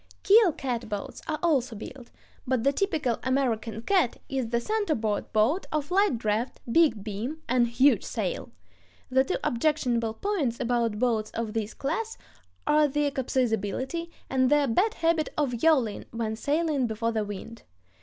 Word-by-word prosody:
Keel 415 -2 +6
catboats 235 -7 -4
are 310 - -1
also 270 -9 +1
built, 240 +4 -9 0.4
but 255 -3 +1
the 275 +2 +3
typical 295 - 0
American 235 -4 -1
"cat" 365 -9 +2
is 260 -4 -2
the 235 0 +1
center 410 - 0
board 215 -2 -2
boat 230 - +2
of 305 +1 -2
light 390 - +3
draft, 220 +3 -1
big 295 -9 +3
beam, 230 +10 -5
and 245 -1 +3
huge 255 +5 +3
sail. - - -3 0.6
The 260 +1 +4
two - - -1
objectionable 235 -4 0
points 315 - -1
about 235 -3 0
boats 220 -2 +1
of 225 -2 -3
this 220 -1 -3
class 435 +11 -3 0.5
are 300 0 +4
their 290 +1 0
capsizability, 260 - -1 0.2
and 260 -1 +2
their 295 -1 +4
bad 385 - +2
habit 330 -2 +1
of 250 -6 -1
yawing 265 -10 +2
when 225 -1 -3
sailing 290 +1 0
before 230 +1 -1
the 220 -2 0
wind. 210 +3 -8
255 Hz, 155 wpm, -27 LUFS, 230-305 Hz, 0.6 s, Keel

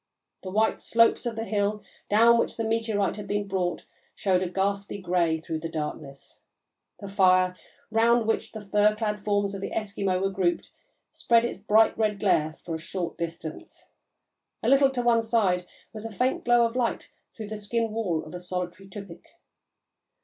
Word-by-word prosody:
The 190 - -7
white 215 +3 +1
slopes 230 +1 +3
of 230 - -3
the 225 - -3
hill 210 -1 -1 0.3
down 230 +3 +6
which - - -1
the 225 - -1
meteorite 220 -3 0
had 205 -1 -7
been 205 0 -1
brought 180 -2 -2 0.3
showed 185 -2 +1
a 185 - -1
ghastly 200 +2 -2
grey 175 -4 +1
through 160 0 -4
the 165 +1 -5
darkness; 150 -3 -7 0.6
the 200 - -7
fire, 185 -2 +3 0.4
round 230 +1 +3
which 225 - -1
the 215 -2 -9
fur 210 +1 +3
clad 210 -2 -3
forms 205 -1 0
of 195 - -6
the - - -3
Eskimo 200 -3 -1
were 195 +1 0
grouped, 185 -2 -1 0.4
spread 235 0 +3
its 240 - -4
bright 215 +2 +4
red 210 -2 +1
glare 155 -6 +1
for 170 - -5
a 160 - -3
short 175 0 -4
distance; 165 -2 -7 0.7
a - - 0
little 275 0 +6
to 255 -2 -2
one 235 -1 +4
side 200 -6 +1 0.3
was 215 -1 -7
a 225 - -6
faint 250 +5 -1
glow 240 -1 +5
of 230 +1 -3
light 245 -2 -1 0.3
through 215 -2 -6
the 215 - -4
skin 225 +2 -1
wall 195 -8 -2
of 155 - -11
a 180 - -5
solitary 180 +1 -5
tupik. 195 -3 -10
205 Hz, 180 wpm, -26 LUFS, 185-225 Hz, 0.7 s, down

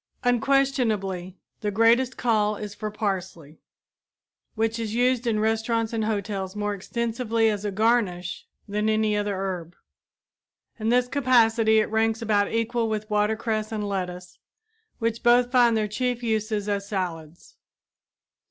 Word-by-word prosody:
Unquestionably 230 -8 +1 0.2
the 210 - -2
greatest 230 +5 +3
call 215 -3 +1
is 205 0 -6
for 215 0 -5
parsley, 185 -7 -4 1.0
which 225 +1 0
is 225 -1 -3
used 250 0 +2
in 220 -2 +1
restaurants 225 +1 0
and 220 -1 0
hotels 200 -2 -3
more 205 0 -1
extensively 230 +2 -1
as 205 -1 -4
a - - 0
garnish 200 -4 0 0.2
than 210 +1 0
any 215 -1 +2
other 205 -1 -1
herb. 180 -3 -4 1.0
In 220 +1 -1
this 245 +1 +3
capacity 230 -5 +3
it 215 - -1
ranks 225 0 +1
about 210 -3 +1
equal 230 0 0
with 215 0 -4
watercress 215 +1 0
and 210 -2 -3
lettuce, 180 -2 -5 0.6
which 230 0 -2
both 245 +1 +4
find 240 -3 +4
their 215 -1 0
chief 245 +3 -2
uses 215 -2 -1
as 200 -1 -2
salads. 170 -5 -5
220 Hz, 135 wpm, -25 LUFS, 205-230 Hz, 1.0 s, both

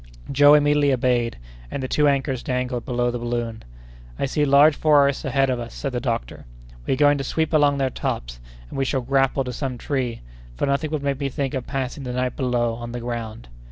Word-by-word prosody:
Joe 145 +2 +7
immediately 145 -1 +3
obeyed, 120 -2 0 0.3
and 135 - -4
the - - -2
two 150 +2 +2
anchors 135 -2 0
dangled 125 -1 -2
below 120 -1 0
the 120 - -4
balloon. 120 -1 -3 0.5
"I - - 0
see 145 +2 0
large 145 +2 +6
forests 140 -3 +3
ahead 135 0 +2
of 125 - -1
us," 120 0 -7
said 140 - -3
the 125 - -2
doctor; 115 - -4 0.4
"we - - +2
are - - -8
going 145 -1 +4
to - - -2
sweep 160 +4 -1
along 145 -2 +4
their 135 -1 0
tops, - - -4 0.3
and - - -5
we - - +2
shall 135 0 0
grapple 135 +1 +1
to 125 -1 -5
some 130 0 -4
tree, 125 -3 -3 0.3
for - - -1
nothing 140 +2 0
would 150 -2 -3
make 140 -1 -1
me 140 -1 -1
think 135 0 -3
of 130 -2 -4
passing 135 0 -3
the 125 -2 -5
night 125 0 -1
below, 120 -3 0
on 120 +1 -7
the 120 - -4
ground." 115 -2 -5
130 Hz, 220 wpm, -23 LUFS, 120-140 Hz, 0.5 s, Joe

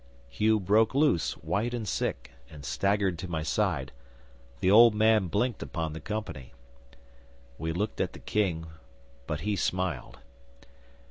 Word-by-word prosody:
'Hugh 110 +10 +2
broke 105 +5 +3
loose, 145 - +2
white 120 +4 -2
and 110 -3 -4
sick, - - -2 0.2
and 75 -2 -11
staggered 100 -1 0
to 95 - -5
my 80 -3 -3
side; 80 - 0 0.7
the 95 - +2
old 115 +1 +8
man 110 -2 +4
blinked 110 +6 -1
upon 80 -3 -3
the 80 - -6
company. 105 -12 -5 1.1
'We 80 0 -2
looked 105 +5 -2
at - - -1
the - - -10
King, 90 -6 -1 0.6
but 75 -2 -3
he 105 +2 -1
smiled. 90 -7 -2
100 Hz, 140 wpm, -28 LUFS, 80-110 Hz, 1.1 s, old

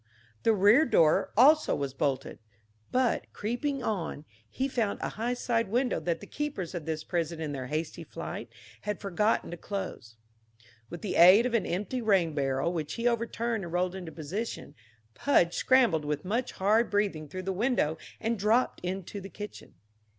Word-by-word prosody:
The 225 - +4
rear 205 +9 +6
door 165 - +3
also 300 +6 +6
was 140 -2 -3
bolted; 135 -1 -2 0.5
but, 255 -2 +1
creeping 255 +5 -2
on, 170 -9 -3 0.2
he 265 - -1
found 230 -6 -1
a - - -2
high 235 +3 -2
side 230 -2 0
window 245 +5 +1
that 170 -2 -2
the - - -8
keepers 285 - -4
of 165 -3 -5
this 155 -1 -2
prison 170 -1 -2
in 155 -2 -3
their 130 -3 -5
hasty 155 +2 -3
flight - - -7 0.3
had 210 0 -3
forgotten 210 +2 0
to 175 - -6
close. 180 - -6 0.7
With 175 - -8
the 205 - -2
aid 185 +7 +8
of 250 - -1
an 230 -5 +1
empty 210 +8 -2
rain 190 -8 +2
barrel, 140 +3 0
which 155 -3 -3
he 235 +1 0
overturned 230 -2 -1
and 170 - -7
rolled 180 0 +1
into 180 -4 -7
position, 170 +2 -5 0.4
Pudge 175 - +3
scrambled 240 -12 +3
with 150 +1 -2
much 235 +7 -1
hard 215 +5 +2
breathing 200 -7 0
through 185 +5 -6
the 190 +1 -2
window 185 - 0 0.2
and 225 -1 -1
dropped 220 +5 +2
into 190 +2 -4
the 195 - -8
kitchen. 210 0 -9
195 Hz, 170 wpm, -29 LUFS, 165-230 Hz, 0.7 s, aid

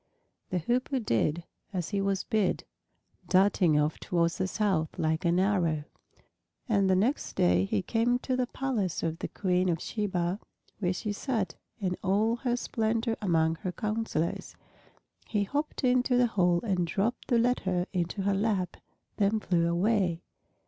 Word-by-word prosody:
The 185 - -1
Hoopoe 250 - 0
did 155 - 0 0.3
as 180 -4 -2
he 200 -2 0
was 195 -1 0
bid, 210 -4 0 0.7
darting 185 -5 +4
off 150 +1 0
towards 170 +1 0
the 190 - +1
south 190 -6 0
like 160 +1 0
an 170 +1 +3
arrow. 175 -6 +1 0.8
And 200 -5 +2
the 185 - +4
next 225 +10 0
day 90 +1 +3
he 95 0 -1
came 235 +2 +2
to 255 +1 -2
the 255 -1 0
palace 235 -11 -2
of 165 0 -2
the - - -3
Queen 185 -1 0
of 165 -2 0
Sheba, 190 -3 -2 0.4
where 180 -3 +1
she 210 +3 -3
sat 210 - -2 0.3
in 185 -3 -1
all 215 +5 +2
her 240 -1 0
splendor 225 0 0
among 165 -4 +2
her 185 0 -4
counselors. 215 -5 -2 0.7
He 210 -2 +1
hopped 290 +8 -3
into 250 0 +3
the 245 - +5
hall 175 -3 +3
and 185 -6 0
dropped 210 +7 -1
the 240 - +3
letter 190 -7 +1
into 180 +2 -1
her 200 0 +2
lap, 195 -3 0 0.4
then 210 +2 +2
flew 170 -4 +1
away. 180 -1 +1
195 Hz, 155 wpm, -29 LUFS, 175-225 Hz, 0.8 s, the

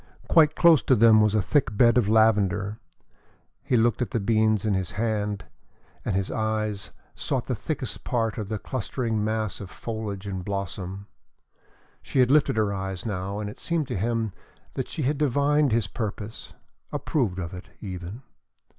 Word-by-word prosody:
Quite 155 -2 +5
close 165 -5 +6
to 130 - +3
them 110 -1 +6
was 105 0 +3
a 105 - +2
thick 120 -6 +1
bed 120 0 +6
of 120 -5 +3
lavender. 105 -2 +3 0.8
He 125 - +1
looked 115 +1 +2
at 125 - 0
the 115 - -1
beans 110 0 +2
in 105 - +2
his 95 -2 -2
hand 105 -2 -1 0.6
and 100 - -1
his 95 -1 -1
eyes 110 -2 -1 0.2
sought - - -2
the - - -2
thickest - - -4
part 115 -2 -1
of 105 -2 -5
the 110 - -1
clustering 115 -2 -2
mass 110 -1 -2
of 100 - -7
foliage 105 -3 -5
and 95 -2 -4
blossom. 100 0 -4 1.0
She - - -5
had 125 0 +5
lifted 150 -6 +4
her 105 -2 +2
eyes 95 0 -4
now 100 -1 -3
and 105 -1 -3
it 105 - -8
seemed 165 -4 -1
to 125 - -2
him 110 +1 -1 0.4
that - - -3
she 155 - -3
had 140 +3 0
divined 145 0 +2
his 115 -2 +2
purpose 105 0 -6 0.4
approved 115 - -1
of 85 -2 -4
it, 90 - -9
even. 95 +4 -7
110 Hz, 170 wpm, -26 LUFS, 100-120 Hz, 1.0 s, close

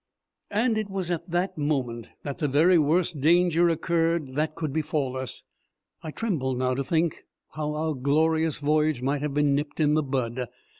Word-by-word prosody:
And 220 +1 +1
it 215 -2 -4
was 190 -3 -3
at 175 +1 -3
that 175 0 -1
moment 130 -6 -2
that 140 +1 -5
the 150 - +1
very 165 +6 +4
worst 160 0 +1
danger 170 +2 +4
occurred 165 -2 0
that 155 +2 -1
could 155 -4 -3
befall 150 -4 -1
us. 130 -1 -4 0.6
I 160 - -6
tremble 155 - -2
now 125 +1 0
when 130 +1 -1
I - - +1
think 160 +3 0 0.3
how 150 -1 -3
our 155 +1 -1
glorious 155 +3 +1
voyage 150 -2 +1
might 140 +2 0
have 145 -1 -3
been 145 -1 +3
nipped 145 +2 -2
in 150 -1 +3
the 155 - +3
bud. 130 -3 -2
155 Hz, 185 wpm, -26 LUFS, 140-165 Hz, 0.6 s, very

